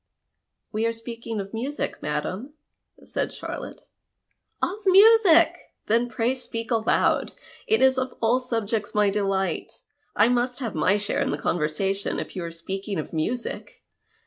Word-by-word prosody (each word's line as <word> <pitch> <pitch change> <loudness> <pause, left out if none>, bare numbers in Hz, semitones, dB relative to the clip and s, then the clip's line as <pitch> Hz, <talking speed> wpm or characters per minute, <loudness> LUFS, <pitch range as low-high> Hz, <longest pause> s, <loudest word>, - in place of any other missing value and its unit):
" - - -56
We 220 +2 +1
arc 230 - -2
speaking 230 -1 -6
of 195 0 -5
musie, 260 +6 -3
madam," 185 - -3 0.5
said - - -2
Charlotte. - - -8 0.4
" - - -20
Of 390 +4 -1
musie! 390 -3 +7 0.3
Then 235 +3 +2
pray 235 +1 0
speak 235 -2 -6
aloud. 225 -1 +2 0.3
It 440 -9 +3
is 260 0 +5
of 260 0 -3
all 230 +3 +3
subjects 225 -4 -2
my 210 -1 +4
delight. 195 -1 -2 0.3
I - - +5
nnist 245 +1 +1
have 245 -5 -4
my 185 +6 +2
share 205 0 -1
in - - 0
the 145 - -1
conversation, 175 +6 -1
if - - -7
you 185 - -3
are 170 - -4
speaking 190 +4 -5
of 155 - -5
music. 235 +10 -3
225 Hz, 155 wpm, -25 LUFS, 195-250 Hz, 0.5 s, musie